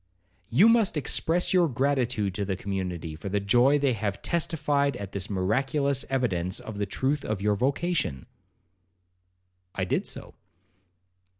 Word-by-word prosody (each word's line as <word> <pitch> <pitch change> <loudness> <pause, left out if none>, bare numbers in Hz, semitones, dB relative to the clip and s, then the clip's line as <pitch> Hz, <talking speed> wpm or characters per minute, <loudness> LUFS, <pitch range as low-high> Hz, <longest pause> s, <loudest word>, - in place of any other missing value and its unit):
'You 155 - +5
must 230 -7 +3
express 165 +5 +1
your 175 -3 +4
gratitude 125 -6 0
to 100 - -2
the 95 -1 -2
community 90 -5 -4
for 90 +6 -6
the 100 +1 0
joy 120 +8 +4
they 140 -3 +1
have 105 -3 -3
testified 150 -4 0
at 100 -1 -7
this 100 -1 -3
miraculous 135 - 0
evidence 95 -9 0
of 105 -2 -8
the 100 - -1
truth 135 +8 -1
of 110 -2 -2
your 105 +1 +1
vocation.' 140 - -1 1.5
I 95 - -1
did - - -1
so. - - -8
120 Hz, 140 wpm, -27 LUFS, 100-140 Hz, 1.5 s, You